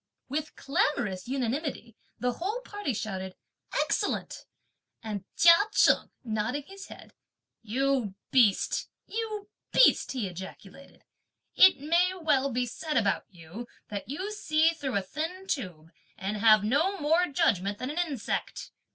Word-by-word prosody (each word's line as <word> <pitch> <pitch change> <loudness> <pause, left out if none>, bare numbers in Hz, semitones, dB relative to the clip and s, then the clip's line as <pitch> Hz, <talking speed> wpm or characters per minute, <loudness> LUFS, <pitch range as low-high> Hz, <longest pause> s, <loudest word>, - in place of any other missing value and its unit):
With 305 +3 -3
clamorous 235 -9 -1
unanimity 260 -2 -3 0.2
the 250 0 0
whole 405 - -3
party 410 - -4
shouted: 190 -4 -4 0.5
"Excellent:" - - -2 0.6
and 205 -3 -5
Chia 335 0 +9 0.2
Cheng - - +4
nodding 225 +4 -2
his 390 +5 -11
head; - - -13 0.5
"You 245 -2 0 0.2
beast, 235 -7 +3 0.2
you 430 -2 -4 0.2
beast!" - - +5
he 240 -7 -2
ejaculated, 190 +8 -11 0.5
"it 375 -5 +7
may 345 +5 +2
well 275 -4 +2
be 250 +1 0
said 300 +6 -3
about 205 -4 +1
you 180 +6 -10 0.2
that 205 +2 -6
you 375 +9 -4
see 320 -6 +2
through 285 -7 -4
a 195 - -1
thin 325 - -5
tube 175 - -4 0.3
and 200 +2 -3
have 215 -1 +6
no 310 - +1
more 325 +4 +3
judgment 205 - +1
than 255 +5 -4
an 320 - -3
insect! 295 -10 -3
265 Hz, 135 wpm, -28 LUFS, 210-325 Hz, 0.6 s, Chia